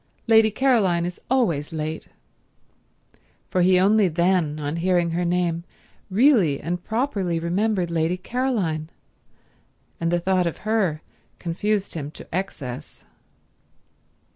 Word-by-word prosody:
Lady 220 -1 +5
Caroline 210 -8 +2
is 175 0 -6
always 175 - +1
late"—for 160 +3 -8
he 180 +1 +5
only 205 +1 +4
then, 170 -2 +1
on 145 +2 -3
hearing 175 -1 +1
her 175 +2 -1
name, 175 -1 0 0.5
really 200 - +4
and 175 +1 -4
properly 220 -8 -1
remembered 180 +1 0
Lady 165 +2 0
Caroline, 190 -8 -2 1.1
and 165 0 0
the 175 - +2
thought 185 0 +1
of 170 - -6
her 195 -9 0 0.3
confused 200 +4 -2
him 145 -3 -5
to - - -12
excess. 145 -10 -5
180 Hz, 115 wpm, -23 LUFS, 165-210 Hz, 1.1 s, Lady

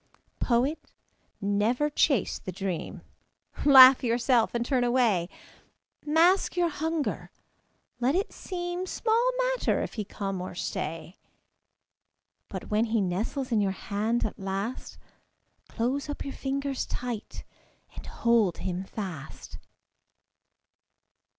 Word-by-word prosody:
Poet, 265 +6 +1 0.6
never 210 +8 +1
chase 280 - +1
the 185 - -6
dream. 185 -2 -5 0.6
Laugh 265 -2 +9
yourself 240 0 +2
and 235 0 0
turn 255 -1 +1
away. 235 -8 +2 0.7
Mask 340 +5 +3
your 350 -1 +3
hunger; 320 0 -3 0.7
let 255 +5 +2
it 390 +3 -1
seem 355 0 -4
Small 460 +5 +1
matter - - +1
if - - -6
he 215 - -3
come 195 -2 -4
or 180 - -6
stay; 165 0 -5 1.3
But - - -7
when 215 +2 +2
he 225 0 0
nestles 215 +8 -2
in 220 -2 +3
your 195 -1 0 0.2
hand 220 +4 +1
at 215 - -5
last, 195 +5 -4 0.7
Close 265 +5 -2
up 290 - -4
your 275 - -5
fingers 275 0 -3
tight 240 -3 -5 0.5
and - - -8
hold 230 -7 +2
him 185 0 -3
fast. 185 -8 -8
240 Hz, 115 wpm, -27 LUFS, 200-285 Hz, 1.3 s, Laugh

